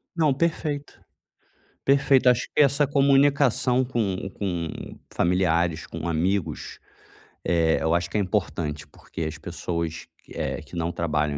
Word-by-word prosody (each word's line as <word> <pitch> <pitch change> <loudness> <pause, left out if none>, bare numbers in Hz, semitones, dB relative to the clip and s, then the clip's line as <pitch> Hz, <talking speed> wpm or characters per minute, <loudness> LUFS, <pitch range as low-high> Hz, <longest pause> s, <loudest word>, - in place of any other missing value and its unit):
Não, 155 -5 +3
perfeito. 150 -2 -2 0.9
Perfeito, 135 -2 +4
acho 125 0 +3
que - - +5
essa 140 +1 +3
comunicação 140 -2 +3
com 105 -7 -2
com 85 -5 -2 0.4
familiares, 85 -2 +1
com 85 - -6
amigos, 85 0 -1 0.7
eh, 80 -2 +2
eu 80 +1 +1
acho 85 0 0
que - - -2
é - - +2
importante, 85 -7 -2
porque 80 - -10
as 80 0 -4
pessoas 85 0 -4 0.2
que - - -22
eh, - - -2
que - - -12
não 85 0 -1
trabalham 75 -3 -1
90 Hz, 135 wpm, -25 LUFS, 80-135 Hz, 0.9 s, que